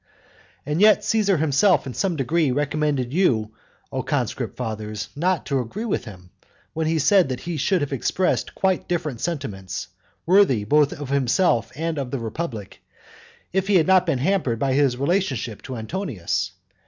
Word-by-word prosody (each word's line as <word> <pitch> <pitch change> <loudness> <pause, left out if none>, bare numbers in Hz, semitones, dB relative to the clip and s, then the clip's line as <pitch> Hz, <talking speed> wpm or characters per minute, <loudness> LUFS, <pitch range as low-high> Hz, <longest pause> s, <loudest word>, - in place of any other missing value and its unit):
And 150 +5 -1
yet 215 0 +6
Caesar 205 -4 +2
himself 160 +6 +3
in 130 - -5
some 190 +2 -1
degree 155 +2 +1
recommended 145 -2 -1
you, 115 - +2 0.4
O - - -2
conscript - - -2
fathers, 110 -3 -4
not 175 +1 0
to 140 -2 0
agree 155 - -4
with 195 - -2
him, 90 -5 -12 0.4
when 160 0 -1
he 160 0 +1
said 175 +2 +4
that 125 -1 -4
he 175 0 -4
should 175 +5 +1
have 145 -1 -2
expressed 180 +8 0
quite 190 -2 0
different 155 -8 -2
sentiments, 120 - -4 0.4
worthy 175 - +4
both 145 +6 +3
of 145 -2 -7
himself 140 0 +2
and 160 0 -2
of 135 -3 -3
the 135 - -2
republic, 115 - -5 0.7
if 190 +1 0
he 205 - +3
had 165 -4 +5
not 190 -1 +4
been - - +1
hampered 145 -5 0
by 135 +2 0
his 135 -3 +2
relationship 140 - -1
to 130 - -7
Antonius. 110 - -3
145 Hz, 165 wpm, -23 LUFS, 125-180 Hz, 0.7 s, yet